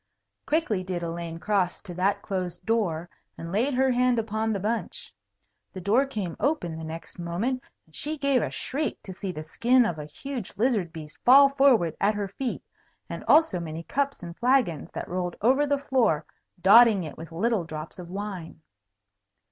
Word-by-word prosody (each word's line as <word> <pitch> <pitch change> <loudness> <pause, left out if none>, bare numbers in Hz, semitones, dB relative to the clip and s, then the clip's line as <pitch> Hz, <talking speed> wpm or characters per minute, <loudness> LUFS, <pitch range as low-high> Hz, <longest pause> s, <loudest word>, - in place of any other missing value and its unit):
Quickly 290 - +1
did 180 -2 -4
Elaine 165 0 -4
cross 190 -1 0
to 185 -4 -8
that 195 +3 0
closed 185 -3 -4
door, 180 -8 0 0.3
and 165 0 -7
laid 245 +8 +1
her 265 +1 +3
hand 250 0 +2
upon 220 0 -1
the 200 - -1
bunch. 220 +4 -3 0.6
The 185 - -6
door 220 +9 +2
came 200 -10 -4
open 265 - 0
the 160 - -7
next 165 +3 -8
moment, 200 +10 -2 0.2
and 160 - -17
she 310 +1 -3
gave 280 -3 +2
a - - -1
shriek 300 +3 -3
to 190 - -8
see 190 +1 -4
the 155 -3 -6
skin 240 +10 +3
of 170 -6 -2
a 150 - -5
huge 245 - -6
lizard 215 -7 +1
beast 155 -2 -10
fall 275 +3 +8
forward 270 - +3
at 205 +2 +3
her 205 -1 -2
feet, 245 +5 -4 0.5
and - - -5
also 310 - +4
many 165 -1 -6
cups 275 +2 -2
and 170 -1 -7
flagons, 240 - +1
that - - -5
rolled 180 0 -3
over 265 +6 +3
the 285 0 +2
floor, 250 - +1 0.3
dotting 205 +1 +7
it 155 - -7
with 165 +1 -10
little 210 +3 0
drops 155 +2 -8
of 175 -1 -8
wine. 190 -4 -6
200 Hz, 180 wpm, -26 LUFS, 170-255 Hz, 0.6 s, fall